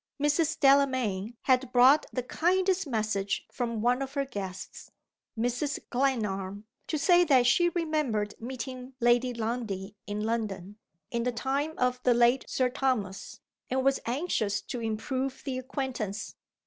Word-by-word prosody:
Mrs. 295 Hz, +2 st, +1 dB
Delamayn 260 Hz, -7 st, +3 dB
had 255 Hz, -1 st, +2 dB
brought 260 Hz, +5 st, +6 dB
the 255 Hz, -, -2 dB
kindest 370 Hz, +5 st, +1 dB
message 215 Hz, -5 st, -1 dB
from 235 Hz, -3 st, -3 dB
one 250 Hz, +2 st, +2 dB
of 270 Hz, +1 st, -5 dB
her 280 Hz, -1 st, 0 dB
guests 195 Hz, -7 st, -7 dB, 0.5 s
Mrs. 245 Hz, +5 st, -1 dB
Glenarm 210 Hz, -6 st, -1 dB, 0.2 s
to 310 Hz, -, -1 dB
say 355 Hz, +4 st, +5 dB
that 260 Hz, -6 st, +5 dB
she 345 Hz, +9 st, +4 dB
remembered 305 Hz, -12 st, -1 dB
meeting 255 Hz, +1 st, -6 dB
Lady 240 Hz, +1 st, +3 dB
Lundie 220 Hz, -4 st, -4 dB
in 205 Hz, 0 st, -3 dB
London, 210 Hz, -3 st, -3 dB, 0.3 s
in 235 Hz, -, -1 dB
the 250 Hz, +1 st, 0 dB
time 275 Hz, +6 st, -2 dB
of 250 Hz, 0 st, 0 dB
the 250 Hz, -1 st, +3 dB
late 240 Hz, +2 st, +4 dB
Sir 255 Hz, -, +2 dB
Thomas, 250 Hz, -7 st, -2 dB, 0.3 s
and 260 Hz, +1 st, 0 dB
was 275 Hz, 0 st, +3 dB
anxious 235 Hz, -, 0 dB
to 245 Hz, -, -6 dB
improve 255 Hz, +4 st, -3 dB
the 260 Hz, -2 st, -2 dB
acquaintance. 250 Hz, -6 st, -4 dB
250 Hz, 140 wpm, -29 LUFS, 220-275 Hz, 0.5 s, brought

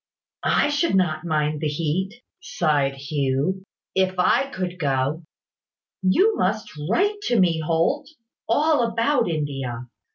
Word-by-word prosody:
"I 290 Hz, -, +3 dB
should 295 Hz, -, +1 dB
not 165 Hz, -4 st, +1 dB
mind 150 Hz, -2 st, 0 dB
the 155 Hz, -, 0 dB
heat," 170 Hz, -, -2 dB, 0.2 s
sighed 145 Hz, -4 st, 0 dB
Hugh, 140 Hz, +5 st, -1 dB, 0.3 s
"if 185 Hz, -1 st, +1 dB
I 270 Hz, +9 st, +3 dB
could 180 Hz, -6 st, -4 dB
go. 140 Hz, +1 st, 0 dB, 0.8 s
You 375 Hz, -, +3 dB
must 210 Hz, +3 st, -1 dB, 0.2 s
write 410 Hz, -, +1 dB
to 240 Hz, -3 st, +2 dB
me, 170 Hz, -3 st, +3 dB
Holt, 160 Hz, +1 st, 0 dB, 0.4 s
all 295 Hz, +3 st, +3 dB
about 230 Hz, +1 st, +1 dB
India. 135 Hz, -6 st, -3 dB
180 Hz, 125 wpm, -23 LUFS, 150-225 Hz, 0.8 s, I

